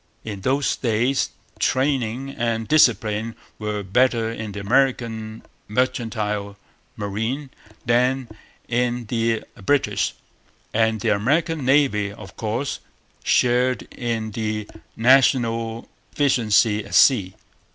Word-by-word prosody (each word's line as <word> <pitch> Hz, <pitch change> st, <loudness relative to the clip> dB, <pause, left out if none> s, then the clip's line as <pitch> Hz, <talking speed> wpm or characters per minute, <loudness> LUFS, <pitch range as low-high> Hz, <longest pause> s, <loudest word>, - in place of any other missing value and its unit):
In 105 Hz, -3 st, -6 dB
those 135 Hz, +6 st, +1 dB
days 120 Hz, +3 st, +1 dB, 0.3 s
training 130 Hz, -1 st, 0 dB
and 115 Hz, -3 st, -2 dB
discipline 115 Hz, -6 st, +2 dB, 0.2 s
were 105 Hz, -1 st, -3 dB
better 115 Hz, +3 st, +2 dB
in 110 Hz, -2 st, -6 dB
the 100 Hz, -, -6 dB
American 110 Hz, -1 st, 0 dB, 0.2 s
mercantile 105 Hz, -4 st, -2 dB, 0.4 s
marine 110 Hz, +7 st, -3 dB, 0.3 s
than 125 Hz, +2 st, +2 dB, 0.4 s
in 120 Hz, 0 st, 0 dB
the 115 Hz, 0 st, 0 dB, 0.2 s
British; 145 Hz, +7 st, +1 dB, 0.6 s
and 110 Hz, -1 st, +1 dB
the -, -, +1 dB
American 150 Hz, +9 st, +1 dB
Navy, 130 Hz, -7 st, +3 dB
of 100 Hz, -3 st, -12 dB
course, 115 Hz, +5 st, -3 dB, 0.4 s
shared 125 Hz, +1 st, +2 dB
in 115 Hz, -3 st, -3 dB
the 105 Hz, -1 st, -3 dB, 0.3 s
national 115 Hz, -2 st, +3 dB, 0.3 s
efficiency 110 Hz, -6 st, +2 dB
at -, -, -5 dB
sea. 100 Hz, -9 st, +5 dB
115 Hz, 100 wpm, -22 LUFS, 105-130 Hz, 0.6 s, sea